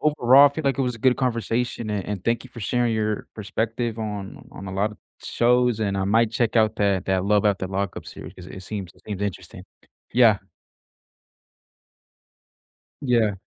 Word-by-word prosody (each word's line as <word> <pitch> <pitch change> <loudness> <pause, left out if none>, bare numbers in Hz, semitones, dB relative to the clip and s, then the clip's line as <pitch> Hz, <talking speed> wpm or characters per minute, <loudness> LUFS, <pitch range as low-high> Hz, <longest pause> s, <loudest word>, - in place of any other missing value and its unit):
overall, 140 -2 +6
I - - -21
feel 160 -1 -4
like 140 0 +1
it - - +2
was 125 -1 -1
a - - -11
good 125 +2 +3
conversation 115 -2 -1
a - - -1
and 100 -1 -4
thank 115 0 0
you 130 - -13
for 115 - -10
sharing 120 +3 0
your 110 -1 -1
perspective 110 +3 -3
on 105 -3 -6
on 95 - -9
a - - -6
lot 100 +3 0
of 105 - -16 0.2
shows 120 -1 +2
and 100 -2 0
I 95 - 0
might 110 +3 +3
check 115 0 0
out 110 -1 +3
that 100 -2 +1
that 95 -1 +1
Love 105 0 +2
After 100 -2 +1
Lockup 95 0 -4
series - - -10
cause 90 -1 -11
it 95 0 -9
seems 100 -3 -6
it - - -24
seems 100 -2 -4
interesting, 100 -3 -5 0.5
yeah. 115 -4 +5 2.6
Yeah. 115 -6 +2
110 Hz, 185 wpm, -24 LUFS, 100-120 Hz, 2.6 s, overall